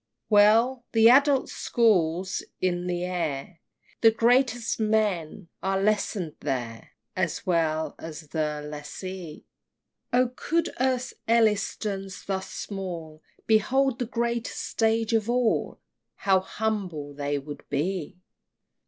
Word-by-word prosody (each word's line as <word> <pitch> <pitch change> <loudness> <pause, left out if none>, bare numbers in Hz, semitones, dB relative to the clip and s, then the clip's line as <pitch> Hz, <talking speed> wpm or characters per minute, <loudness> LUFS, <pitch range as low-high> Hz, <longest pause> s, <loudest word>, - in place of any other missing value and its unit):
XXXII. - - -58
Well! 225 +5 +5
the 225 0 +7
Adults' 275 0 +4
School's 185 -6 +1 0.2
in 180 -1 0
the 175 0 -1
air! 165 -4 -3 0.4
The 225 - +8
greatest 235 +1 +2
men 210 -5 0
are 195 0 0
lesson'd 195 -5 0
there 120 -5 -4 0.2
As 175 -4 -2
well 160 -3 +1
as 155 -2 -8
the 150 -2 -2
Lessee! 160 +3 -7 0.7
Oh 250 0 +3
could 335 +4 -1
Earth's 255 -1 0
Ellistons 210 -3 0
thus 190 -1 -3
small 170 -6 -6 0.2
Behold 255 +4 +2
the 245 - -2
greatest 235 0 -2
stage 225 0 +1
of 225 0 +1
all, 245 -2 +1 0.4
How 190 -1 +3
humbled 185 -9 -3
they 145 0 -1
would 145 +1 -8
be! 170 +4 -2
195 Hz, 115 wpm, -26 LUFS, 165-225 Hz, 0.7 s, The